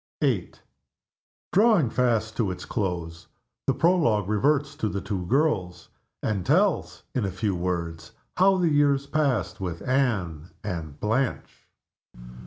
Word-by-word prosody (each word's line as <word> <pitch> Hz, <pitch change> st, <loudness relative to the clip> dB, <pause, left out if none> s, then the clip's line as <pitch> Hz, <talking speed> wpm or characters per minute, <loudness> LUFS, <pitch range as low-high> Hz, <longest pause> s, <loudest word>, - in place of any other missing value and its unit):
VIII. -, -, 0 dB, 1.0 s
Drawing 200 Hz, -, +4 dB
fast 115 Hz, -3 st, +1 dB
to 110 Hz, -5 st, 0 dB
its 90 Hz, 0 st, -6 dB
close, 85 Hz, -6 st, -3 dB, 0.4 s
the -, -, +4 dB
Prologue 120 Hz, -, +2 dB
reverts 140 Hz, +7 st, +1 dB
to 110 Hz, -, -1 dB
the 100 Hz, -, -3 dB
two 95 Hz, -3 st, -4 dB
girls 100 Hz, -, 0 dB, 0.3 s
and 100 Hz, -4 st, -1 dB
tells, 140 Hz, -, +1 dB
in 125 Hz, -, 0 dB
a 100 Hz, -, 0 dB
few 100 Hz, 0 st, -1 dB
words, 85 Hz, -2 st, -3 dB, 0.3 s
how 190 Hz, +1 st, +5 dB
the 175 Hz, -3 st, +2 dB
years 140 Hz, -1 st, +3 dB
passed 125 Hz, -, 0 dB
with 85 Hz, -3 st, -4 dB
Anne 100 Hz, -, 0 dB
and 80 Hz, -7 st, -5 dB
Blanche. 115 Hz, +4 st, -2 dB
105 Hz, 130 wpm, -26 LUFS, 90-140 Hz, 1.0 s, how